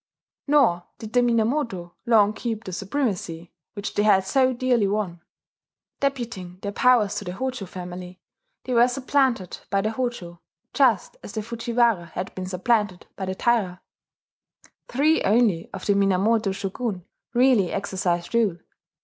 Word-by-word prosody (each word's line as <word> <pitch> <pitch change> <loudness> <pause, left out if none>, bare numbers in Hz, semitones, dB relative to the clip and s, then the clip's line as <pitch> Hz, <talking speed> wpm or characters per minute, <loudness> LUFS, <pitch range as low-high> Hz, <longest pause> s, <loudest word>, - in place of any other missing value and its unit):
Nor 270 -13 +3
did 220 -1 -9
the 245 - +5
Minamoto 230 - 0
long 215 -3 +5
keep 225 -1 -4
the 185 - -7
supremacy 190 - -3 0.2
which 205 -1 -5
they - - +1
had 205 -3 +4
so 260 +5 +3
dearly 245 -4 +1
won. 195 -4 -2 0.8
Deputing 235 -10 -3
their 200 - -2
powers 225 -3 +3
to 210 - -3
the 180 - -4
Hojo 255 -2 -4
family, 180 0 -8 0.4
they 255 - -3
were 240 +1 +6
supplanted 255 -6 0
by 195 -1 +1
the 215 +2 -1
Hojo, 220 -9 -4 0.3
just 245 -9 +2
as - - -9
the 215 -2 -3
Fujiwara 230 -4 +1
had 185 - -4
been 185 -1 -5
supplanted 190 0 0
by 190 - -5
the 190 - -2
Taira. 200 -6 +1 1.1
Three 300 +6 +2
only 205 -6 +2
of - - -7
the 205 - +3
Minamoto 200 +2 +2
shogun 195 0 -4 0.3
really 240 -8 +4
exercised 185 -3 -2
rule. 220 -7 +2
210 Hz, 145 wpm, -24 LUFS, 185-240 Hz, 1.1 s, were